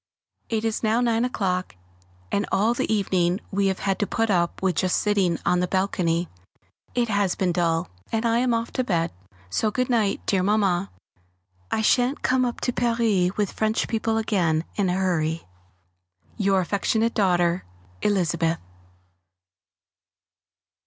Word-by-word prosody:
It 225 -1 -1
is 225 -1 -1
now 220 +1 +2
nine 235 -1 +2
o'clock, 185 - -2 0.6
and 200 - 0
all 220 +4 +3
the 240 - -2
evening 185 -3 +1
we 200 0 +1
have 190 -1 0
had 195 -1 -1
to 205 - 0
put 225 -2 0
up 170 -2 +1
with 190 -2 0
just 185 -1 +2
sitting 195 -5 +1
on 180 - +3
the 180 - 0
balcony. 180 -3 0 0.7
It 240 -1 +2
has 205 -3 +1
been 185 -2 0
dull, 165 -1 0 0.2
and 225 +1 0
I 230 0 +3
am 250 0 +1
off 230 0 -1
to 255 - -1
bed, 170 -8 0 0.4
so 215 - +1
good 250 +4 -1
night, 215 -4 +1
dear 195 -2 +2
Mamma. 195 -2 +1 0.8
I 220 - 0
shan't 250 +5 +2
come 255 0 +2
up 240 - -4
to 250 - 0
Paris 225 -7 +1
with 205 -3 0
French 220 0 0
people 225 0 0
again 175 -8 +1
in 200 -3 +1
a - - +1
hurry! 170 -4 0 0.9
Your 195 -3 +2
affectionate 220 +5 0
daughter, 175 -3 +2 0.4
Elizabeth. 170 -5 +1
200 Hz, 150 wpm, -24 LUFS, 180-225 Hz, 0.9 s, all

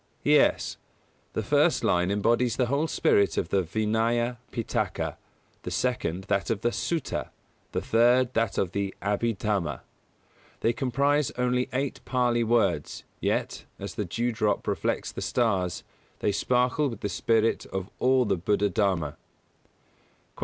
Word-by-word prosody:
Yes: - - +3 0.6
the - - -2
first - - +3
line 90 +1 +2
embodies 115 +4 +2
the 125 - +2
whole 140 +6 0
spirit 130 -11 +2
of 85 - -1
the 95 - +2
Vinaya 115 +5 0
Pitaka, 115 - -2 0.5
the - - -5
second 95 -8 -1
that 95 - -1
of 110 -3 -1
the 120 - +1
Sutta, 165 +2 -2 0.4
the - - -1
third 120 +2 +3
that 115 -2 0
of 90 - 0
the 100 -1 -2
Abhidhamma. 100 - -1 0.8
They 115 - +2
comprise 140 +3 +1
only 125 0 +1
eight 135 +1 -2
Pālī 120 -2 +1
words, 105 -10 +1 0.2
yet, - - -1
as - - -6
the - - -3
dew 120 +1 -1
drop 110 -3 0
reflects - - -1
the - - -6
stars, 95 -8 0 0.3
they 105 - 0
sparkle 125 +7 +1
with 115 -4 -8
the - - -1
spirit 115 +2 +1
of 95 -1 -4
all 130 0 +3
the 100 -3 +1
Buddha 105 +3 +1
Dharma. 95 -7 0 1.2
148. - - -12
115 Hz, 145 wpm, -27 LUFS, 100-125 Hz, 1.2 s, Yes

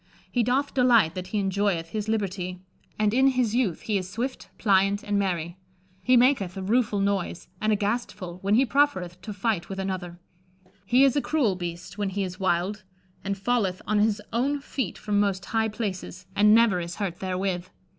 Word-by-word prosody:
He 245 - +2
doth 255 +5 +1
delighte 240 -10 +4
that 185 0 -5
he 210 - -3
enjoyeth 195 -4 0
his 215 +2 -3
libertie; 185 -4 -2 0.4
and 210 0 +2
in 265 +2 +5
his 250 -5 +1
youth 235 -9 0
he 210 -3 0
is 185 -1 -6
swifte, 250 +6 -4
plyante, 200 -1 +2
and 205 -1 0
merye. 175 -2 -2 0.4
He 250 +5 +4
maketh 235 -7 +3
a 190 - -4
rufull 215 0 +1
noyse 195 -3 -2
and 215 0 +2
a - - +4
gastefulle 200 -4 -3
when 200 +2 +2
he 260 +4 +4
profereth 185 -12 +1
to 215 - -7
fighte 200 -4 -1
with 195 - -5
another. 185 -2 -4 0.7
He 250 +5 +5
is 275 -1 +4
a 285 - +2
cruell 270 -12 +1
beaste 175 +2 -6
when 205 -1 0
he 200 +1 -2
is 185 -1 -6
wilde, 190 +2 0 0.4
and 200 0 -2
falleth 195 -3 0
on 215 0 +1
his 210 0 +2
owne 275 +5 +1
feete 275 -1 -4
from 205 -1 0
moste 195 -3 0
highe 220 -1 +1
places: 190 -4 -5
and 210 +1 +6
never 225 -5 +4
is 170 0 -5
hurt 190 -5 -3
therewith. 185 -1 -2
200 Hz, 190 wpm, -26 LUFS, 185-230 Hz, 0.7 s, and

